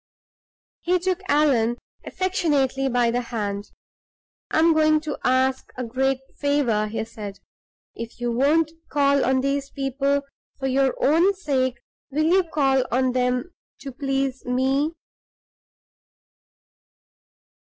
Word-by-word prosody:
He 360 +1 +1
took 370 +1 -1
Allan 260 -7 +3 0.3
affectionately 290 -8 0
by 240 -2 +2
the 245 +1 0
hand. 205 -4 -4 0.8
"I - - -1
am 325 +1 +5
going 310 0 +4
to 300 -1 -5
ask 260 +1 +1
a 250 - -3
great 265 +3 0 0.2
favor," 270 -8 +1
he 220 +1 -3
said. 210 -3 -8 0.6
"If 230 0 -8
you 240 0 -1
won't 295 +6 +2 0.2
call 280 -1 +3
on 260 0 +2
these 275 +1 -1
people 275 +1 -1 0.3
for 270 - -5
your 265 0 +2
own 340 +7 +4
sake, 260 -8 0 0.3
will 300 +3 0
you 370 +3 +4
call 275 -5 +1
on 255 +1 +2
them 250 +6 -1 0.3
to 275 0 -6
please 270 0 -2
me?" 265 +5 +1
270 Hz, 120 wpm, -23 LUFS, 250-300 Hz, 0.8 s, am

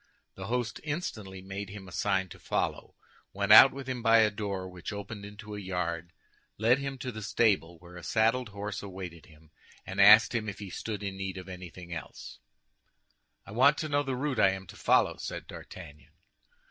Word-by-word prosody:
The 95 0 -8
host 120 -1 -2
instantly 110 - -5
made 95 +1 -6
him 100 -1 -9
a - - -11
sign 95 0 0
to - - -12
follow, - - -2 0.4
went - - 0
out - - +11
with 135 -1 -8
him 125 -2 -3
by 115 -1 +5
a 110 -1 +5
door 100 -3 -4
which 90 +1 -7
opened 100 0 -7
into 105 +1 -10
a 105 - -5
yard, 90 -3 -3 0.5
led 115 +5 +3
him 140 -1 -4
to 125 0 -5
the 110 -2 -7
stable, 95 -4 +1
where 90 +1 -13
a 90 - -10
saddled 115 +6 +1
horse 100 0 -5
awaited 90 -4 -8
him, 80 0 -20 0.3
and 95 +2 -1
asked 105 +4 +8
him 110 -3 -1
if 100 - -7
he 100 -3 -8
stood 105 +1 -5
in 100 -1 -4
need 95 -1 -4
of 90 0 -8
anything 90 -1 -9
else. 80 - -8 1.1
"I - - -11
want 135 +7 +5
to 155 - -3
know 145 0 +2
the 135 -2 -2
route 135 0 -2
I 95 - +5
am 95 0 -7
to - - -12
follow," - - +3
said - - -6
D'Artagnan. 75 +1 -11
100 Hz, 200 wpm, -29 LUFS, 95-115 Hz, 1.1 s, out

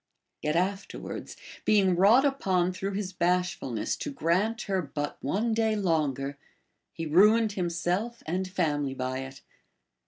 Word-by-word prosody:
* - - -56
Yet 150 +1 -1
afterwards, 195 +3 -3 0.3
being 195 -4 +4
wrought 215 +10 +6
upon 185 -10 +1
through 195 +2 -3
his 195 -2 -3
bashful 180 -3 0
ness 110 -3 -2
to - - -4
grant 220 - 0
her 190 -2 0
but 145 -1 -5
one 210 - 0
day 220 -1 +1
longer, 145 -7 -1 0.5
he 165 - -5
ruined 210 +7 +5
himself 180 +5 -2
and 185 +3 -2
family 145 -7 -1
by 130 0 -2
it. 135 0 -8
180 Hz, 145 wpm, -28 LUFS, 155-205 Hz, 0.5 s, wrought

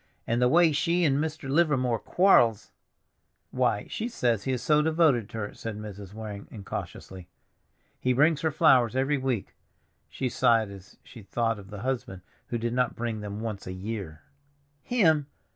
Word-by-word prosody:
And 120 +2 0
the 125 - +4
way 170 +3 +5
she 170 +4 +1
and 140 -2 +2
Mr. 155 -2 -3
Livermore 135 -6 +2
quar'ls!" 120 - +3 0.8
"Why, 125 -5 0
she 230 +2 -4
says 120 - 0
he 130 - 0
is 125 -2 -2
so 150 -1 +4
devoted 155 -8 +2
to - - -8
her," 105 -2 -4
said 115 -2 -6
Mrs. 100 -2 -9
Waring 105 -2 -7
incautiously. 95 -3 -8 0.7
"He 125 - +1
brings 150 +4 +3
her 160 - +1
flowers 135 -7 +4
every 135 +2 +1
week." 130 -6 -2 0.6
She 130 - -3
sighed 115 -3 +2
as 95 -1 -13
she 115 - -13
thought 115 +2 -1
of 100 -1 -13
the 105 -1 -8
husband 120 -8 -3 0.2
who 120 - -2
did 115 +1 -2
not 125 -1 0
bring 115 -2 -3
them 105 +1 -6
once 110 -5 -5
a 95 - -4
year. 95 -5 -6 0.6
"Him! 160 - +2
120 Hz, 170 wpm, -27 LUFS, 105-145 Hz, 0.8 s, way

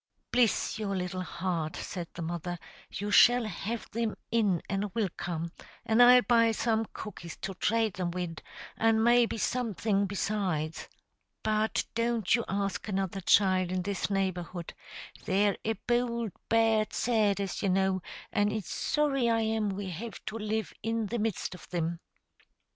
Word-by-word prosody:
"Bliss 235 -2 +2
your 200 -2 -2
little 185 0 -3
heart!" 170 -3 -3
said 175 -3 -5
the 170 - -4
mother; 175 +1 -3 0.3
"you 205 +2 -4
shall 245 +3 +6
have 215 +3 -4
thim 230 -1 -2 0.2
in 210 -7 +2
an' 200 +1 -1
wilcome, 175 -5 -2 0.3
an' 225 +2 +4
I'll 245 0 +8
buy 230 -2 +4
some 225 0 0
cookies 175 -5 -8
to 195 - -3
trate 220 +2 0
thim 180 -2 -1
wid, 175 -2 -4 0.4
and 225 0 +3
maybe 240 -1 +4
something 215 -4 0
besides. 185 -6 -2 0.5
But 215 0 +1
don't 230 -3 +1
you 235 +1 +3
ask 200 +1 -2
another 195 -1 -2
child 185 -1 +4
in 185 -1 -1
this 200 +1 -2
neighborhood; 180 -3 -2 0.5
they're 200 +1 +2
a 225 - +1
bould, 235 0 -1 0.2
bad 225 -1 +3
set, 215 -4 +2
as 195 -2 -3
you 200 - +1
know, 190 0 +2 0.3
and 205 0 +2
it's 215 -3 -4
sorry 275 -5 +1
I 225 0 +2
am 220 -1 0
we 195 -1 -4
have 210 +6 -7
to 220 - -5
live 215 +1 -2
in 225 0 -1
the 235 +3 -2
midst 215 -3 -2
of 180 - -10
thim." 170 -1 -3
205 Hz, 155 wpm, -30 LUFS, 185-225 Hz, 0.5 s, I'll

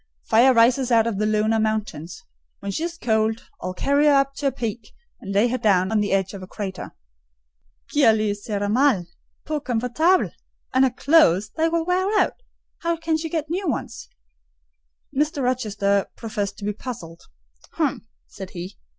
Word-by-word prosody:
"Fire 235 +4 +5
rises 250 +2 +3
out 225 -1 +5
of 225 -4 -2
the 215 - +1
lunar 215 +1 +2
mountains: 215 -7 -3 0.3
when 200 - -5
she 310 - -3
is 340 0 -6
cold, 220 -4 0
I'll 185 0 -4
carry 280 +7 +2
her 295 - +6
up 275 0 +3
to 285 - 0
a - - +2
peak, 225 -2 -5 0.3
and 195 - -7
lay 205 +4 +3
her 255 +2 -1
down 190 -2 +2
on 220 - +2
the 205 - 0
edge 195 0 0
of 195 - -8
a 185 - -9
crater." 190 -2 -6
"Oh, - - -47 1.0
qu'elle 230 -7 +5
y 210 -1 +1
sera 205 0 -3
mal—peu 245 - -1
comfortable! 255 +8 +1 0.4
And 260 +1 +5
her - - +3
clothes, 235 - +3
they 325 0 +2
will 330 0 0
wear 365 +2 +1
out: - - +2 0.5
how 335 0 -1
can 325 0 -1
she 320 +1 -3
get 315 -1 -3
new 375 +3 -2
ones?" - - -4 1.1
Mr. 295 0 0
Rochester 205 -5 0
professed 205 -3 -4
to 200 - -7
be 210 - -1
puzzled. 195 -8 -8 0.5
"Hem!" 285 -7 -1 0.2
said 190 -2 -9
he. 180 +2 -7
225 Hz, 175 wpm, -23 LUFS, 205-285 Hz, 1.1 s, her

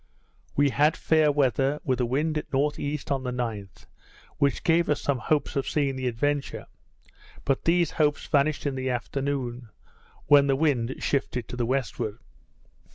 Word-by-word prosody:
We 145 -1 +3
had 150 +4 +3
fair 155 -2 +3
weather, 140 0 +1
with 130 -2 0
the 125 - +1
wind 150 +6 0
at 150 - -3
N.E., 145 +1 0
on 135 -1 0
the 125 - -3
9th, 115 -6 -5 0.5
which 140 -1 +1
gave 170 0 +3
us 150 - +2
some 140 -3 -1
hopes 145 +4 0
of 140 - -1
seeing 140 -3 0
the 130 -1 -2
Adventure; 140 +4 -1 0.8
but 135 -1 0
these 170 0 +3
hopes 150 -2 +1
vanished 145 +1 +1
in 140 - 0
the 130 0 -2
afternoon, 125 -1 -3 0.6
when 145 -1 +6
the 135 - +3
wind 135 -4 +1
shifted 125 -3 -1
to - - -5
the 120 -1 -1
westward. 120 -4 -2
140 Hz, 160 wpm, -26 LUFS, 125-150 Hz, 0.8 s, when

